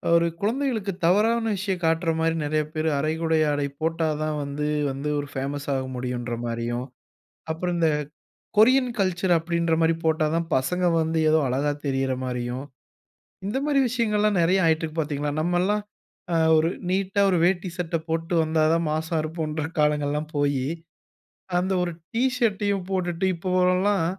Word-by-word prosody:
ஒரு 170 0 +4
குழந்தைகளுக்கு 225 -3 0
தவறான 220 +6 +3
விஷயம் 190 -2 -2
காட்ற 165 +1 +1
மாரி 165 0 +1
நெறைய 155 +1 0
பேரு 160 0 0
அரைகுறை 160 +2 0
ஆடை 145 0 0 0.2
போட்டாதான் 155 -2 0
வந்து 140 +1 -3 0.2
வந்து 140 +2 -4
ஒரு 145 - -4
பேமஸ் 140 +2 -3
ஆக 130 - -1
முடியும்ன்ற 125 -1 -3
மாரியும், 120 +1 -2 0.7
அப்புறம் 175 +2 -2
இந்த 165 -1 +4 0.7
கொரியன் 255 +4 +5
கல்ச்சர் 185 -1 +2
அப்டின்ற 170 0 0
மாரி 165 0 +3
போட்டாதான் 160 +1 +1
பசங்க 180 +8 0 0.2
வந்து 160 0 0
ஏதோ 160 +1 +4
அழகா 140 +3 0
தெரியிற 135 -1 0
மாரியும். 125 +1 -3 0.8
இந்த 215 +7 -1
மாரி 285 -2 +3
விஷயங்கள்லாம் 210 -4 +1
நெறைய 185 +3 +3
ஆயிட்டுருக்கு 160 0 0
பாத்தீங்களா? 145 -1 -2
நம்ம 175 +2 +1
எல்லாம் 210 +2 +1 0.5
அ - - +3 0.2
ஒரு 160 +1 +2 0.2
நீட்டா 195 +2 +1
ஒரு 180 - +2
வேட்டி 185 0 0
சட்ட 170 -1 -1
போட்டு 165 +2 -1
வந்தாதான் 160 +1 +2
மாஸா 160 +2 -1
இருப்போம்ன்ற 155 -1 -3 0.2
காலங்கள் 150 -1 +2
எல்லாம் 150 +1 -3
போயி, 140 -2 +1 0.9
அந்த 185 +2 0
ஒரு 175 - -3 0.2
டீஷர்ட்டையும் 220 -6 +1
போட்டுட்டு 180 -1 -1
இப்பவெல்லாம், 185 +1 +2
165 Hz, 140 wpm, -25 LUFS, 150-185 Hz, 0.9 s, கொரியன்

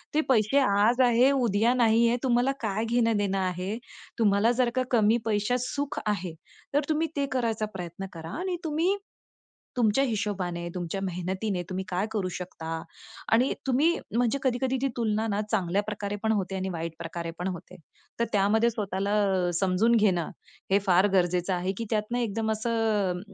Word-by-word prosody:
ते 310 - +4
पैसे 240 +2 +4 0.2
आज 235 +5 +4
आहे, 245 +3 +5
उद्या 235 -3 +2
नाही 235 -1 +4
आहे. 240 - +1
तुम्हाला 250 +1 +3
काय 215 0 -1
घेणं-देणं 225 -4 +1
आहे? 185 +3 -2 0.4
तुम्हाला 210 +1 +4
जर 245 - +3
का 255 - +2
कमी 225 -1 +4
पैशात 215 +2 +1
सुख 285 0 -3
आहे, 190 -5 -1 0.4
तर 290 - +4
तुम्ही 315 +1 +1
ते 280 - +2
करायचा 225 -4 0
प्रयत्न 180 +1 -6
करा 165 -1 -8
आणि 365 -1 -2
तुम्ही 325 +6 +1 0.8
तुमच्या 240 +3 +3
हिशोबाने, 190 -6 -2
तुमच्या 180 +2 -3
मेहनतीने, 185 +2 -2
तुम्ही 190 0 -3
काय 185 +3 0
करू 205 -4 -1
शकता 180 -3 -7 0.7
आणि 245 +4 +4
तुम्ही 270 +5 +3 0.3
म्हणजे 245 +3 +1
कधी-कधी 260 +1 +1
ती 275 - +2
तुलना 220 -1 0
ना 205 0 0
चांगल्या 195 -1 +1
प्रकारे 205 -1 -4
पण 220 - +2
होते 195 -2 -2
आणि 190 0 -2
वाईट 165 0 -3
प्रकारे 170 0 -5
पण 180 - -2
होते. 180 -2 -6 0.4
तर 235 - +2
त्यामध्ये 210 +3 +3
स्वतःला 200 -3 -2 0.5
समजून 195 +5 +3
घेणं 190 -7 +2 0.4
हे 200 - +5
फार 185 +2 +5
गरजेचं 180 0 +2
आहे, 180 +1 -1
की 230 - -3
त्यातनं 215 +3 0
एकदम 220 -1 -1
असं 220 -4 0
210 Hz, 160 wpm, -27 LUFS, 190-235 Hz, 0.8 s, आहे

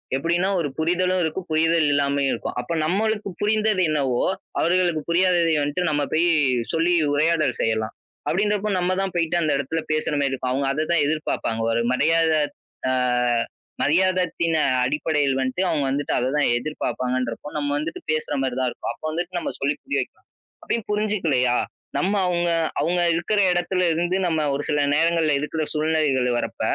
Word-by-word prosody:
எப்டின்னா 170 +7 +1
ஒரு 155 -4 -1
புரிதலும் 180 +3 +1
இருக்கும், 160 +3 -3
புரிதல் 160 0 +3
இல்லாமயும் 140 -1 +1
இருக்கும். - - -5
அப்ப 125 - -4
நம்மளுக்கு 210 +4 0
புரிந்தது 210 -2 +2
என்னவோ, 135 -5 0 0.4
அவர்களுக்கு 175 -2 +2
புரியாததை 170 -1 +3
வந்துட்டு 145 +5 -1
நம்ம 145 -1 0
போய் 165 +2 +3 0.5
சொல்லி 165 +2 +2 0.2
உரையாடல் 155 -3 +2
செய்யலாம். 110 -1 0 0.4
அப்டின்றப்போ 210 +2 0
நம்ம 180 +1 0
தான் 195 -1 -2
போய்ட்டு 170 0 0
அந்த 155 - +1
எடத்துல 140 +4 -2
பேசுற 155 0 -1
மாரி 140 -1 +1
இருக்கும். 130 -1 -2
அவுங்க 135 +2 0
அத 150 +3 -1
தான் 170 - +3
எதிர்பாப்பாங்க. 145 -7 -2
ஒரு 115 - +1
மரியாத 160 +4 +3 0.6
ஆ, - - +2 0.9
மரியாதத்தின் 170 0 +1 0.3
அடிப்படையில் 145 0 0
வன்ட்டு, 130 +7 -1
அவுங்க 150 -4 0
வந்துட்டு 140 +2 -1
அத 125 +1 0
தான் 145 - +2
எதிர்பாப்பாங்கன்றப்போ 125 -1 -3
நம்ம 145 -1 -1
வந்துட்டு 155 +3 -4
பேசுற 155 -1 -2
மாரி 130 -2 -1
தான் 130 - +1
இருக்கும். - - -5
அப்போ - - -11
வந்துட்டு 175 +2 -3
நம்ம - - -3
சொல்லி 140 +2 0
புரிய 280 - -1
வைக்கலாம். - - -10 0.4
அப்டியும் 230 -3 -2
புரிஞ்சுக்கலையா? 170 -13 +1 0.4
நம்ம 195 +3 +1
அவுங்க, 175 -1 0 0.3
அவுங்க 175 +1 +1
இருக்கிற 175 +6 0
இடத்துல 180 +1 0
இருந்து 175 +3 0
நம்ம 160 -2 0
ஒரு 140 +1 -2
சில 150 -1 +1 0.2
நேரங்கள்ல 165 0 +2
இருக்கிற 155 +2 -2
சூழ்நிலைகள்ல 150 -5 +1
வர்றப்ப, - - -4
160 Hz, 155 wpm, -23 LUFS, 140-175 Hz, 0.9 s, புரிதல்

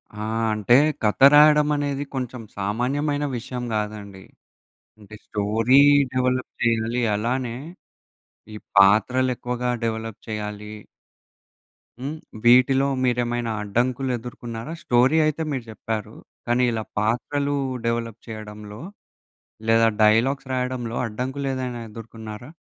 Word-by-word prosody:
ఆ! 105 +1 -5 0.3
అంటే 105 +3 +3 0.3
కథ 105 -1 +1
రాయడం 150 0 +6
అనేది 145 -1 -2
కొంచెం 125 -2 -4 0.2
సామాన్యమైన 135 +9 -1
విషయం 125 +1 -6
గాదండి! 105 -2 -4 0.8
అంటే 105 0 -13
స్టోరీ 110 +5 +2 0.3
డెవలప్ 130 0 0
జెయ్యాలి. 115 +1 +1
అలానే 120 +2 -2 1.0
ఈ - - -6 0.2
పాత్రలు 110 +6 +5
ఎక్కువగా 125 +1 -2
డెవలప్ 110 -1 -3
చేయ్యాలి. 105 0 -5 1.3
హ్మ్. 145 +4 -4 0.3
వీటిలో 130 +3 +5 0.2
మీరేమైనా 120 -1 0
అడ్డంకులు 125 +5 -1
ఎదుర్కొన్నారా? 120 +2 -7
స్టోరీ 125 +5 +3
అయితే 155 +1 -1
మీరు 130 -4 -3
జెప్పారు. 110 -1 -5 0.3
కానీ 120 +1 +2
ఇలా 110 -1 -2 0.2
పాత్రలు 140 +6 0 0.3
డెవలప్ 115 -1 -2
చేయడంలో 105 -1 -9 0.9
లేదా 115 0 +5
డైలాగ్స్ 130 +6 +3
రాయడంలో 125 -2 -2
అడ్డంకులేదైనా 130 +1 -3
ఎదుర్కున్నారా? 110 +1 -9
120 Hz, 100 wpm, -23 LUFS, 110-130 Hz, 1.3 s, రాయడం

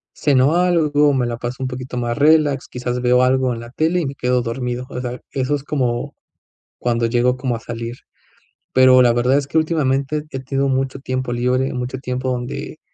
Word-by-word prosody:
ceno 140 +1 +3
algo, 155 -5 +3
me 130 -2 +1
la 120 -1 -3
paso 120 +1 -5
un - - -1
poquito 125 0 -6
más 120 -1 -2
relax, 150 -1 +3
quizás, 125 0 -3
veo 125 0 +4
algo 130 0 +2
en 115 - -6
la 120 0 -10
tele 160 +6 +1
y - - -2
me 135 - -4
quedo 125 -1 +1
dormido. 125 +1 -3
O 125 - -5
sea, 125 0 -5
eso 135 +2 0
es 140 - -5
como, 130 -2 -2 0.6
cuando 120 -1 0
llego 125 +2 +1
como 125 -2 -1
a 115 - -5
salir. 115 +1 -6 0.8
Pero, 130 0 +6
la 120 - +5
verdad 125 +3 +2
es 145 - 0
que 160 - -1
últimamente 150 -2 0
he 135 - -4
tenido 135 +1 -1
mucho 135 0 -1
tiempo 130 -2 -3
libre, 125 +2 0
mucho 125 +1 -4
tiempo 130 0 -3
donde 125 -1 -5
130 Hz, 200 wpm, -20 LUFS, 125-140 Hz, 0.8 s, Pero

